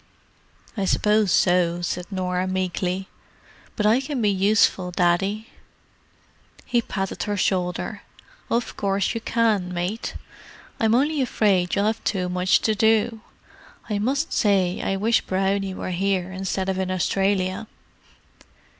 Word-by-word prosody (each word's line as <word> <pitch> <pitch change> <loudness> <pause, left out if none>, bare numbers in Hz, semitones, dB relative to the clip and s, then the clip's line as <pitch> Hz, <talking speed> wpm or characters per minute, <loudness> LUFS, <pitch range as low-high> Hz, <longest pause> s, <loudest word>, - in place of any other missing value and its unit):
"I 200 -3 -1
suppose 210 0 +2
so," 175 -1 +2
said 175 0 -3
Norah 185 -1 -1
meekly. 185 0 -2 0.7
"But 210 - -1
I 225 +5 +4
can 275 0 -4
be 210 -3 +2
useful, 195 -1 +2
Daddy." 195 +5 0 1.2
He 240 -1 +1
patted 195 -4 -4
her 205 - -1
shoulder. 180 -2 -1 0.5
"Of 235 +1 -1
course 195 +1 0
you 230 - -4
can, 220 -6 +1
mate. 180 +5 -3 0.6
I'm 225 0 +3
only 290 +3 +2
afraid 195 -8 +1
you'll 200 0 +1
have 220 +1 -1
too 180 -3 -1
much 180 +1 +2
to 220 - +1
do. 220 +1 +2 0.7
I 205 - 0
must 275 +9 -1
say 190 -4 +2
I 195 - -1
wish 220 +4 +2
Brownie 195 0 -1
were 185 - -4
here 190 0 -1
instead 190 0 -3
of 190 -1 -1
in 190 -1 -1
Australia." 190 +2 0
195 Hz, 135 wpm, -23 LUFS, 185-215 Hz, 1.2 s, I